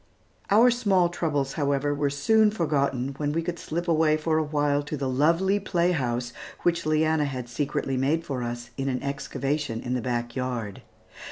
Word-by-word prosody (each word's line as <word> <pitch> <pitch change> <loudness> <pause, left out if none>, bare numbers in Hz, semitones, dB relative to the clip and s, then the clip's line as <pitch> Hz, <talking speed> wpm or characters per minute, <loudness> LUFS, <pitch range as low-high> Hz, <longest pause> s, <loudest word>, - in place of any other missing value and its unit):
Our 230 +5 +6
small 195 -7 +2
troubles, 145 -6 -1
however, 145 -1 0
were 145 0 0
soon 215 +10 +3
forgotten, 140 - 0
when 145 -1 -1
we 165 +1 0
could 175 0 -4
slip 170 +3 -4
away 155 -2 +3
for 155 0 +1
a - - +1
while 145 -1 +1
to 150 +1 -5
the 135 -1 -2
lovely 165 +9 +2
playhouse 135 -11 0 0.3
which 170 -2 +1
Leanna 155 0 +2
had 130 -3 -4
secretly 135 +1 -2
made 150 +6 +1
for 135 -5 -3
us 120 0 -5
in 135 0 -1
an 125 0 -2
excavation 140 -2 -2
in 125 +1 -3
the 125 - -1
back 120 -1 -3
yard. 125 -6 -3
145 Hz, 175 wpm, -26 LUFS, 130-165 Hz, 0.3 s, Our